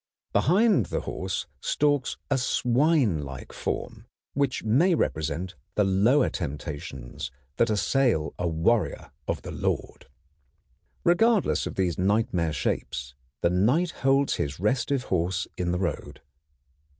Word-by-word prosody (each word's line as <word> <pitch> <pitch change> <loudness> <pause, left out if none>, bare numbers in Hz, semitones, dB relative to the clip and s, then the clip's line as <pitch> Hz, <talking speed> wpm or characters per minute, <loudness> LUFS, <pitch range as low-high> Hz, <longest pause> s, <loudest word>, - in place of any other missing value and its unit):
Behind 190 - +4
the - - -2
horse 95 0 -3
stalks 145 -3 +1
a 140 - +4
swinelike 120 - +1
form, - - -4 0.3
which 140 -2 0
may 155 - +4
represent 80 - -1 0.2
the 105 - +4
lower 105 +9 +4
temptations 70 -4 -5 0.3
that 115 - +3
assail 110 - +1
a 90 - 0
warrior 80 +2 0 0.2
of - - -2
the - - -6
Lord. - - -3 1.0
Regardless 215 +4 +3
of - - -6
these 90 -4 0
nightmare 95 -4 +1
shapes, 65 -2 -3 0.3
the 85 - +3
Knight 125 - +2
holds 135 +1 +3
his 70 +2 -3
restive 125 +6 +1
horse 90 -3 0
in 90 -1 -1
the 90 - 0
road. 90 -7 -4
100 Hz, 120 wpm, -26 LUFS, 85-135 Hz, 1.0 s, Behind